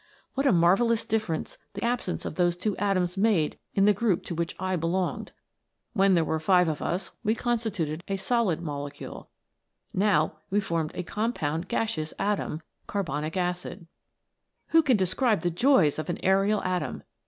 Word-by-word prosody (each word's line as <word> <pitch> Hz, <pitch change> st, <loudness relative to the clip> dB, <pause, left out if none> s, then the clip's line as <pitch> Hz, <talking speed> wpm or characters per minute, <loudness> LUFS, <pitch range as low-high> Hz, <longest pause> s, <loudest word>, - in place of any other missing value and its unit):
What 275 Hz, +1 st, +1 dB
a -, -, +5 dB
marvellous 195 Hz, +7 st, +3 dB
difference 215 Hz, -8 st, -2 dB, 0.2 s
the -, -, -4 dB
absence 235 Hz, -6 st, -1 dB
of -, -, -3 dB
those 175 Hz, +1 st, +1 dB
two 205 Hz, +2 st, -1 dB
atoms 185 Hz, -2 st, 0 dB
made 195 Hz, -7 st, +2 dB, 0.2 s
in 195 Hz, -, +4 dB
the 210 Hz, -, +6 dB
group 205 Hz, -3 st, +1 dB
to -, -, -5 dB
which 170 Hz, 0 st, -2 dB
I 185 Hz, 0 st, 0 dB
be 165 Hz, -1 st, -1 dB
longed. 180 Hz, +1 st, -1 dB, 0.6 s
When 195 Hz, -3 st, +4 dB
there 165 Hz, -2 st, +3 dB
were 160 Hz, -, -1 dB
five 180 Hz, +2 st, +4 dB
of 155 Hz, -2 st, -2 dB
us 180 Hz, +4 st, -2 dB
we 220 Hz, 0 st, +2 dB
consti 235 Hz, -1 st, -1 dB
tuted 160 Hz, -4 st, -3 dB
a 195 Hz, -, -1 dB
solid 195 Hz, -4 st, +1 dB
molecule; 145 Hz, -2 st, -6 dB, 0.6 s
now 160 Hz, -6 st, +2 dB
we 205 Hz, -, +2 dB
formed 165 Hz, -5 st, -2 dB
a 180 Hz, -, -3 dB
compound 175 Hz, -6 st, -2 dB
gaseous 165 Hz, -10 st, -2 dB
atom.* 195 Hz, -6 st, -1 dB
" -, -, -44 dB, 1.8 s
Who 325 Hz, -, +6 dB
can 260 Hz, -7 st, +3 dB
describe 200 Hz, +4 st, +1 dB
the 175 Hz, -, 0 dB
joys 180 Hz, -, +3 dB
of 155 Hz, -, -4 dB
an 175 Hz, -, -1 dB
aerial 195 Hz, +2 st, +3 dB
atom 180 Hz, -1 st, -2 dB
185 Hz, 165 wpm, -27 LUFS, 170-215 Hz, 1.8 s, the